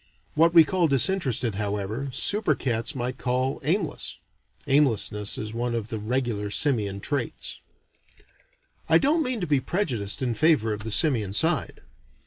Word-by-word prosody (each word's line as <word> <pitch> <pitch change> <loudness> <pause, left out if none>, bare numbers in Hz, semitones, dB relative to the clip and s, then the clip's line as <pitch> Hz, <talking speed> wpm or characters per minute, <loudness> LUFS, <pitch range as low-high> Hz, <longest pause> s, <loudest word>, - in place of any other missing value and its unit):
What 165 +2 +3
we 165 -1 +7
call 175 +2 0
disinterested, 135 - +1
however, 105 +6 -4
super 200 - +2
cats 120 +3 -2
might 125 +1 -4
call 130 +1 -2
aimless. 170 +2 -2 0.5
(Aimlessness 110 -7 +2
is 110 0 -6
one 120 +1 -3
of 115 -2 -4
the 110 - -4
regular 110 -2 -2
simian 105 -5 +2
traits.) 145 +8 -4 1.3
I - - +6
don't 305 +4 +2
mean 255 -5 -2
to - - -1
be 145 -4 +1
prejudiced 130 - -2
in 120 -2 -1
favor 125 -6 +2
of 105 -1 -6
the 110 - -5
simian 110 - +2
side. 155 +4 +1
130 Hz, 145 wpm, -25 LUFS, 110-155 Hz, 1.3 s, we